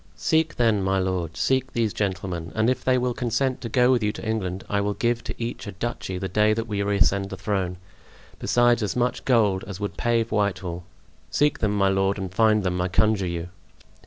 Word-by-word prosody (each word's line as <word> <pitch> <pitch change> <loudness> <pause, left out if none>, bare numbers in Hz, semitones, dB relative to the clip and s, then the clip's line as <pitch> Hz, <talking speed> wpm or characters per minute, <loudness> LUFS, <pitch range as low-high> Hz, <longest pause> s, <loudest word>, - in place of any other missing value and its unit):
"Seek, 160 -1 +1
then, 115 -4 +2
my 95 0 +1
lord, 90 -3 -2
seek 130 -1 +1
these 115 -3 0
gentlemen; 90 -4 -3
and 110 +3 +3
if 125 -1 -3
they 130 -1 +3
will 125 0 0
consent 125 +3 -1
to 115 - -5
go 125 +2 +4
with 125 -2 +3
you 105 0 +1
to - - -8
England, 95 -4 -2
I 100 0 0
will 100 0 -1
give 120 +3 0
to - - -4
each 115 -2 -5
a 100 - -6
duchy 95 -2 -4
the 95 +1 -3
day 105 +2 +3
that 115 0 -2
we 105 -3 -2
reascend 100 -1 +2
the 95 - -6
throne, 95 -2 -2 0.6
besides 120 -1 +3
as 105 - -1
much 125 0 0
gold 105 -7 +3
as 100 -2 -7
would 105 -1 -4
pave 115 -1 +1
Whitehall. 95 -5 -1 0.4
Seek 150 0 +1
them, 105 -2 0
my 100 -1 +3
lord, 95 +1 +1
and 95 -2 -5
find 110 0 +3
them, 90 -1 -1
I 90 - +1
conjure 100 0 +2
you." 85 0 -4
105 Hz, 215 wpm, -24 LUFS, 95-120 Hz, 0.6 s, go